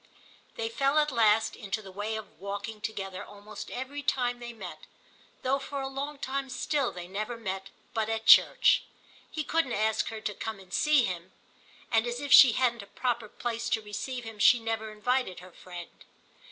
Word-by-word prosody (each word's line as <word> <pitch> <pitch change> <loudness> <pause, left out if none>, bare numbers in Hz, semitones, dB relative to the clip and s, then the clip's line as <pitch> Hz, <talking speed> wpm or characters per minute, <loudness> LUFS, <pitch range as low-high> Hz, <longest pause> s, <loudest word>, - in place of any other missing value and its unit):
They 225 - -2
fell 275 +5 +1
at 300 -1 +3
last 225 -2 +3
into 205 +2 -4
the 190 - -10
way 205 +3 -3
of 220 -1 -8
walking 205 +2 -5
together 195 -4 -4
almost 205 +1 -9
every 265 +3 -5
time 245 -3 0
they 240 0 -6
met, 180 -9 -9 0.6
though 270 +2 +2
for 280 +1 -5
a 270 - -2
long 280 +2 -4
time 275 0 -3
still 265 0 0
they 175 -1 -8
never 215 +5 -4
met 195 -3 -4 0.2
but 220 -1 0
at 225 0 -2
church. - - +7 0.5
He 310 - -3
couldn't 315 -5 0
ask 215 +1 +1
her 225 - -5
to 210 - -3
come 220 0 -5
and 185 -1 -14
see 300 -5 +4
him, 180 0 -5 0.6
and 225 0 +3
as 240 0 -3
if 285 0 +1
she 255 -4 +10
hadn't 240 -1 +1
a 200 - -12
proper 235 0 -2
place 235 +1 -3
to 225 - +1
receive 240 +5 -5
him 225 -2 -9
she 245 +3 +7
never 225 -1 -3
invited 230 -1 -1
her 180 +1 -13
friend. 175 -1 -10
225 Hz, 190 wpm, -29 LUFS, 205-255 Hz, 0.6 s, she